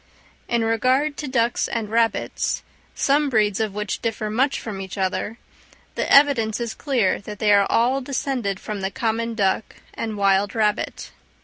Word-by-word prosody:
In 235 -1 +1
regard 255 +6 +1
to 295 - -4
ducks 240 -2 +1
and 225 -2 -3
rabbits, 230 0 0 0.3
some 285 +1 +2
breeds 210 -4 +2
of 215 -3 -2
which 210 -1 -3
differ 215 -2 -2
much 265 +5 +1
from 200 -4 -6
each 190 +1 -7
other, 195 +3 -2 0.6
the - - -2
evidence 255 -7 +5
is 235 -2 -3
clear 250 -10 0
that 210 +1 -8
they 210 -1 +3
are 200 -1 +5
all 250 +4 +2
descended 250 -7 -2
from 210 -2 -5
the 190 - -1
common 230 -1 -2
duck 200 0 0 0.2
and 220 -2 -4
wild 200 +1 +2
rabbit. 210 -2 -1
225 Hz, 165 wpm, -22 LUFS, 205-250 Hz, 0.6 s, evidence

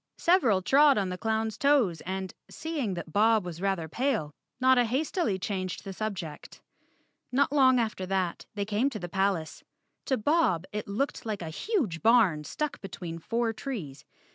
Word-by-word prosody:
Several 250 - +3
trod 280 +4 +5
on 195 -2 0
the 180 - -4
clown's 220 -1 -1
toes 270 - +3
and, 190 0 -4 0.2
seeing 290 - -3
that 170 -2 -7
Bob 220 -1 +4
was 175 -1 -7
rather 195 -5 -1
pale, 215 - -1 0.3
Notta 255 -1 +5
hastily 260 - 0
changed 185 -1 -4
the 195 - -6
subject. 185 -7 -6 0.7
Not 275 +2 +2
long 260 -3 +5
after 215 -5 -2
that 185 -2 -2
they 200 -1 -1
came 215 +6 +1
to 235 - -6
the 175 - -5
palace. 190 -3 -1 0.4
To 265 - +1
Bob 215 - +2
it 210 0 -4
looked 220 +8 -2
like 210 -5 -4
a 160 - -5
huge 230 - -1
barn 215 -10 +4
stuck 300 - -4
between 175 -4 -7
four 230 +5 -1
trees. 185 - -6
210 Hz, 165 wpm, -28 LUFS, 185-260 Hz, 0.7 s, trod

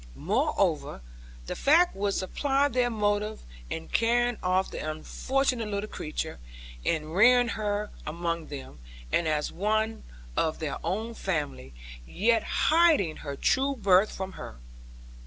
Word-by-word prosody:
Moreover 65 - 0 0.4
that - - -4
fact 335 +5 +4
would 200 0 -1
supply 275 +8 +1
their 250 -2 +1
motive 210 -1 -1 0.3
in 80 +3 -5
carrying 240 0 +2
off 185 +1 +1
the - - -5
unfortunate 235 - -1
little 205 0 -3
creature, 155 - -5 0.4
and 155 -1 -1
rearing 245 +5 +6
her 210 -1 -2
among 170 0 -3
them, 135 - -9 0.3
and 170 - +2
as 150 -1 0
one 215 +3 0 0.3
of 160 -1 0
their 155 -3 -4
own 215 +7 -2
family; 145 - -3 0.3
yet 225 - +2 0.3
hiding 315 - +4
her 140 -2 -6
true 270 - +1
birth 195 -3 +4
from 190 0 -5
her. - - -9
205 Hz, 130 wpm, -28 LUFS, 160-235 Hz, 0.4 s, rearing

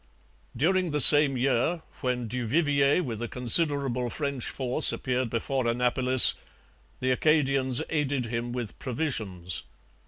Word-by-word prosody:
During 180 +6 -1
the 150 -1 -3
same 145 -1 +7
year, 135 +6 -2 0.2
when 125 -3 -4
Du 125 +1 -6
Vivier 145 +3 0
with 115 -6 -7
a 120 - -5
considerable 125 0 -1
French 140 -1 -4
force 130 +3 0
appeared 130 -2 -4
before 120 +2 -4
Annapolis, 125 +2 +6 0.7
the 130 0 -1
Acadians 135 -2 0
aided 145 -5 -3
him 120 +1 -6
with 120 -4 -8
provisions. 110 - -4
130 Hz, 125 wpm, -25 LUFS, 120-145 Hz, 0.7 s, same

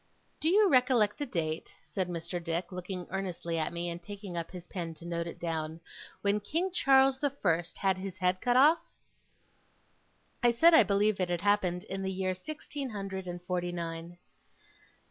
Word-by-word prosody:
'Do 315 - +2
you 410 +3 +6
recollect 250 - +3
the 290 - -2
date,' 160 -6 -3
said 185 -2 -2
Mr. 170 +1 -4
Dick, 170 +2 -2
looking 180 0 -5
earnestly 180 -3 -2
at 155 - -1
me, 170 0 -3
and 170 0 -4
taking 200 -1 -8
up 165 -1 -3
his 180 -1 -9
pen 170 -3 -5
to 165 - -12
note 170 0 -2
it 170 - -8
down, 160 -1 -3 0.4
'when 200 +1 +2
King 330 - -1
Charles 270 -4 +5
the 285 - +2
First 175 -10 -1
had 190 -1 +1
his 190 -1 -6
head 185 0 +1
cut 245 0 +3
off?' 300 +6 +5 1.5
I 240 - +5
said 325 +9 +6
I 320 - +9
believed 205 0 +2
it 175 -2 0
happened 195 -4 +2
in 195 0 -5
the 190 0 -2
year 185 0 -1
sixteen 285 +6 -6
hundred 195 -3 -5
and 175 0 -6
forty 175 -1 -2
nine. 170 0 -5
185 Hz, 180 wpm, -31 LUFS, 175-215 Hz, 1.5 s, I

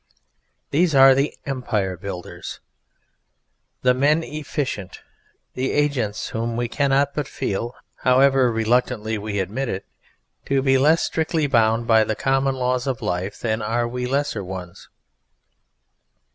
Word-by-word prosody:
These 165 0 +2
are 135 0 +8
the 140 +3 0
Empire 110 -9 -2
Builders, 90 0 -7 1.2
the 125 0 +5
Men 150 +5 +2
Efficient, 145 - -4 0.5
the 130 +1 -2
agents 130 -8 0
whom 115 +1 -3
we 120 0 0
cannot 140 +2 +1
but 150 -3 -2
feel 115 +5 -3 0.2
however 130 -1 +4
reluctantly 110 -1 0
we 105 0 -4
admit 110 +8 -2
it 95 +1 -4 0.6
to 135 -1 +1
be 135 -1 +4
less 155 +5 +4
strictly 160 -1 0
bound 115 -3 +2
by 110 -1 +5
the 110 0 -2
common 135 +1 +1
laws 125 0 -1
of 130 -3 -2
life 90 +3 -3
than 110 -1 -1
are 120 +2 0
we 125 +1 -3
lesser 140 -5 -1
ones. 90 -2 -8
125 Hz, 130 wpm, -22 LUFS, 110-135 Hz, 1.2 s, are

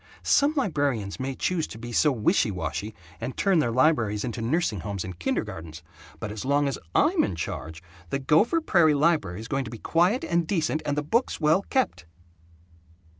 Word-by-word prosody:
Some 290 +2 +3
librarians 140 - -1
may 130 0 -3
choose 170 +1 -1
to - - -10
be 120 +1 -7
so 150 +5 +3
wishy 130 - +2
washy 90 +3 -4 0.2
and 130 - -5
turn 195 -4 +3
their 125 - +1
libraries 115 -5 +2
into 115 -1 -4
nursing 120 - 0
homes 100 +1 -4
and 95 -2 -8
kindergartens, 80 -1 -4 0.4
but 105 - -5
as 105 -1 -6
long 140 +2 +2
as 135 - -3 0.2
I'm - - +4
in 90 - -2
charge, 80 +1 -6 0.3
the - - 0
Gopher 160 - +3
Prairie 170 - +4
library 145 - +1
is 115 - -8
going 135 +1 -1
to - - -7
be 115 - -8
quiet 175 - +1
and 170 -1 0
decent, 160 -4 0
and 145 0 -1
the 150 - 0
books 230 - 0
well 155 +4 +3
kept!" 255 - 0
135 Hz, 185 wpm, -26 LUFS, 105-165 Hz, 0.4 s, I'm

